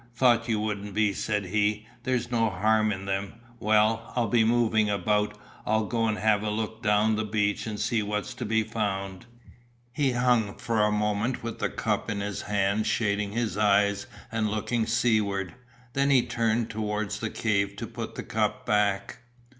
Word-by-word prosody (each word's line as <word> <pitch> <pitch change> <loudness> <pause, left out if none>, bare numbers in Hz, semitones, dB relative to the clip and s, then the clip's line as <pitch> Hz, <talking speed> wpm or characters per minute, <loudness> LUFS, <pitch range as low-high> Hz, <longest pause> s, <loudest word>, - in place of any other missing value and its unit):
"Thought 120 -1 +3
you 110 -2 +1
wouldn't 105 -2 -3
be," 105 -1 +2
said 105 0 -1
he, 105 +2 0
"there's 125 -2 -1
no 115 -2 +2
harm 110 +3 +2
in 95 -1 -4
them. 100 0 -2 0.3
Well, 110 +1 +2
I'll 120 -3 +1
be 115 +1 +4
moving 110 -2 +2
about. 105 +1 0 0.3
I'll 110 0 +1
go 115 +1 0
and 110 -1 0
have 105 -1 +2
a 105 - -2
look 110 +1 -3
down 105 0 +3
the 110 - 0
beach 105 -1 0
and 105 -2 -4
see 115 +1 +1
what's 105 0 -3
to - - -6
be 110 +1 +2
found." 100 -2 -3 0.7
He 140 -3 +1
hung 120 -4 +2
for 115 -2 0
a 105 0 +3
moment 105 +4 0
with 115 0 -5
the - - 0
cup - - -2
in 105 -1 -2
his 100 0 -3
hand 105 +1 0
shading 105 -2 0
his 115 -4 -1
eyes 100 -1 +3 0.2
and 110 -1 0
looking 110 +2 -1
seaward, 110 -5 +1 0.4
then 140 +1 +2
he 130 -3 +5
turned 115 0 0
towards 105 -1 -2
the 110 - -2
cave 100 -3 0
to 105 - -5
put - - -7
the - - -5
cup - - -1
back. 105 -2 +1
105 Hz, 180 wpm, -27 LUFS, 105-115 Hz, 0.7 s, he